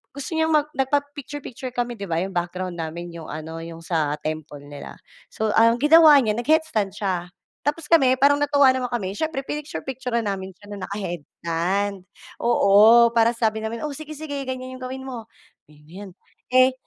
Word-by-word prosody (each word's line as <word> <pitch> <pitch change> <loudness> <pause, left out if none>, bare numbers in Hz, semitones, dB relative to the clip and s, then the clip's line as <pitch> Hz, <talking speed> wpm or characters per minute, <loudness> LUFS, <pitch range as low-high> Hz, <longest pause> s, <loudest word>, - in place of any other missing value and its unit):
gusto 280 +5 -6
niyang 320 0 +2
mag 300 0 +2
nagpapicture-picture 280 -2 -3
kami, 240 -2 -2
'di 200 - -5
ba, 165 +1 0
'yong 195 - -5
background 175 0 -3
namin 170 +2 -5
'yong 165 -2 -9
ano 160 +1 -7
'yong 165 0 -9
sa 155 -3 0
temple 155 -2 -5
nila, 145 0 -10 0.3
so 220 -1 -2
ang 230 +1 +5
ginawa 310 0 +8
niya 215 - +1
nag-headstand 245 - +1
siya, 185 -4 -2 0.4
tapos 295 +1 -2
kami 265 -6 +5
parang 285 +2 +4
natuwa 285 -2 +4
naman 255 -1 -2
kami, 230 -6 -3
siyempre 315 -4 -2
pinicture-picturan 265 -5 -4
namin 190 -2 -4
siya 205 +2 -15
na 200 -2 -6
naka-headstand, 185 +1 -3 0.4
oo, 230 +1 +6
para 230 0 +3
sabi 220 -1 0
namin, 220 +3 -5
"O 300 - -3
sige-sige, 305 0 -6
ganiyan 255 0 -6
'yong - - -9
gawin 265 +1 -7
mo, 245 -4 -7 0.4
kaya 150 -1 -20
mo 150 - -22
'yan." 195 +2 -9 0.4
Eh, 255 +1 +6
230 Hz, 170 wpm, -23 LUFS, 185-270 Hz, 0.4 s, ginawa